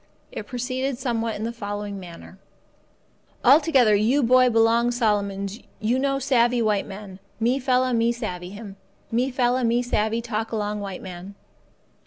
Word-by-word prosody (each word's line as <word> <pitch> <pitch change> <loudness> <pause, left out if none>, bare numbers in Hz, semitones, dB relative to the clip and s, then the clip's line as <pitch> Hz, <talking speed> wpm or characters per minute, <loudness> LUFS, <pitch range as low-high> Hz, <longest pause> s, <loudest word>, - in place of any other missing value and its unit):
It - - -7
proceeded 255 +1 -3
somewhat 230 -3 -2
in 210 - -5
the 230 - -2
following 205 -2 -5
manner: 180 +1 -12 1.1
"Altogether 270 -4 +5
you 230 +8 +3
boy 255 +1 +5
belong 230 +1 +3
Solomons 205 -3 -1 0.2
you 235 +4 +1
no 275 0 +1
savvee 250 -3 +2
white 210 -3 +1
man. 195 -1 -9 0.2
Me 245 +4 +1
fella 255 -1 +1
me 230 0 +2
savvee 180 -7 -5
him. 200 0 -10 0.3
Me 245 +3 +1
fella 255 0 +1
me 235 +1 +2
savvee 220 -1 0
talk 225 -1 -3
along 210 -1 -2
white 195 -2 -6
man. 185 +2 -9
230 Hz, 150 wpm, -24 LUFS, 205-250 Hz, 1.1 s, Altogether